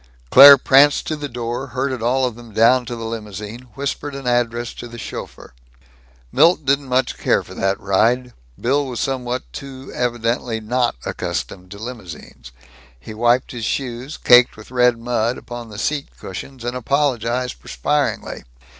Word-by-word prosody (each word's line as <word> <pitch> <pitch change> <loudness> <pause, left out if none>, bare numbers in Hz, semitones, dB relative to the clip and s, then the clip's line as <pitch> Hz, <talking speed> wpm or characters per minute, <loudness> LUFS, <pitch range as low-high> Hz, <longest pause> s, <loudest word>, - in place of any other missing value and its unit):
Claire 140 +1 +11
pranced 140 +2 +4
to 155 - -2
the 145 -1 -6
door, 120 +2 -4
herded 130 0 -3
all 130 +3 +1
of 125 - -2
them 120 0 -13
down 120 +2 +4
to 120 - -4
the 115 -1 -6
limousine, 110 +2 -7
whispered 140 +1 -4
an 135 -1 -8
address 120 -1 0
to 120 - -9
the 120 0 -11
chauffeur. 115 - -8 0.8
Milt 165 -3 +4
didn't 140 0 +1 0.3
care - - +2
much - - -10
for - - -11
that 95 0 -1
ride. 120 +6 +1 0.3
Bill 140 +3 +1
was 125 -3 -5
somewhat 125 -2 -2
too 135 -2 -9
evidently 120 -1 -1
not 120 - 0
accustomed 90 -1 -4
to 100 - -10
limousines. 95 - -9 0.5
He - - -10
wiped 120 +4 +2
his 120 -3 -6
shoes, 130 +3 -4
caked 125 -1 +5
with 110 +3 -13
red 125 -1 +3
mud, 120 0 -1
upon 120 -1 -8
the 105 - -10
seat 145 +5 -2
cushions, 120 +7 -8
and 120 +1 -3
apologized 125 -2 -1
perspiringly. - - -2
120 Hz, 160 wpm, -20 LUFS, 115-130 Hz, 0.8 s, Claire